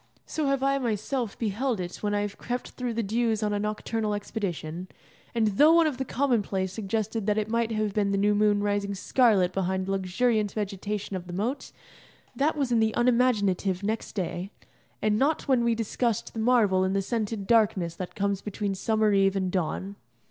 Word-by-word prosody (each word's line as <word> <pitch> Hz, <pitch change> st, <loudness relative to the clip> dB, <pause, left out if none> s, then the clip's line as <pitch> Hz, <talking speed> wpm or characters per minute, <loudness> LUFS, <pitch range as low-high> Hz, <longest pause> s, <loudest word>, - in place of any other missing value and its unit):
So 310 Hz, -2 st, -2 dB
have 275 Hz, -1 st, +1 dB
I 275 Hz, 0 st, +2 dB
myself 235 Hz, 0 st, -2 dB
beheld 225 Hz, +2 st, -1 dB
it 175 Hz, -1 st, -5 dB
when 205 Hz, -1 st, -1 dB
I 205 Hz, -, +1 dB
have 205 Hz, -1 st, -4 dB
crept 245 Hz, +1 st, -4 dB
through 245 Hz, -2 st, -4 dB
the 230 Hz, -, 0 dB
dews 220 Hz, +1 st, 0 dB
on 210 Hz, -1 st, 0 dB
a 205 Hz, -, 0 dB
nocturnal 215 Hz, 0 st, -2 dB
expedition: 185 Hz, -5 st, -4 dB, 0.5 s
and 220 Hz, -2 st, +3 dB
though 305 Hz, +3 st, +8 dB
one 335 Hz, -1 st, +5 dB
of 295 Hz, -5 st, -1 dB
the 265 Hz, -, -1 dB
commonplace 210 Hz, -9 st, 0 dB
suggested 220 Hz, +1 st, -2 dB
that 210 Hz, 0 st, +2 dB
it 215 Hz, -1 st, 0 dB
might 230 Hz, -1 st, +1 dB
have 215 Hz, -2 st, -1 dB
been 205 Hz, -1 st, +1 dB
the 200 Hz, -, +1 dB
new 205 Hz, +1 st, +3 dB
moon 205 Hz, 0 st, +3 dB
rising 205 Hz, -1 st, -1 dB
scarlet 195 Hz, -4 st, +3 dB
behind 190 Hz, 0 st, -1 dB
the 195 Hz, -, -3 dB
luxuriant 205 Hz, +3 st, +1 dB
vegetation 205 Hz, -1 st, -3 dB
of 180 Hz, -1 st, -6 dB
the 175 Hz, -, -7 dB
moat, 225 Hz, +10 st, -3 dB, 0.6 s
that 300 Hz, +3 st, +1 dB
was 275 Hz, -4 st, 0 dB
in 235 Hz, -, +4 dB
the 220 Hz, 0 st, +1 dB
unimaginative 210 Hz, -6 st, +2 dB
next 220 Hz, +2 st, -2 dB
day, 185 Hz, -1 st, -3 dB, 0.5 s
and 215 Hz, 0 st, +2 dB
not 295 Hz, +3 st, +1 dB
when 255 Hz, -3 st, +3 dB
we 235 Hz, -1 st, +2 dB
discussed 230 Hz, 0 st, -1 dB
the 225 Hz, -, -5 dB
marvel 220 Hz, -5 st, +3 dB
in 190 Hz, 0 st, 0 dB
the 195 Hz, 0 st, +1 dB
scented 215 Hz, -1 st, -2 dB
darkness 200 Hz, -7 st, +2 dB
that 185 Hz, -, -6 dB
comes 200 Hz, -2 st, -1 dB
between 205 Hz, -1 st, -3 dB
summer 215 Hz, +2 st, +1 dB
eve 195 Hz, 0 st, +3 dB
and 190 Hz, -2 st, -1 dB
dawn. 190 Hz, +3 st, -2 dB
210 Hz, 195 wpm, -27 LUFS, 195-235 Hz, 0.6 s, though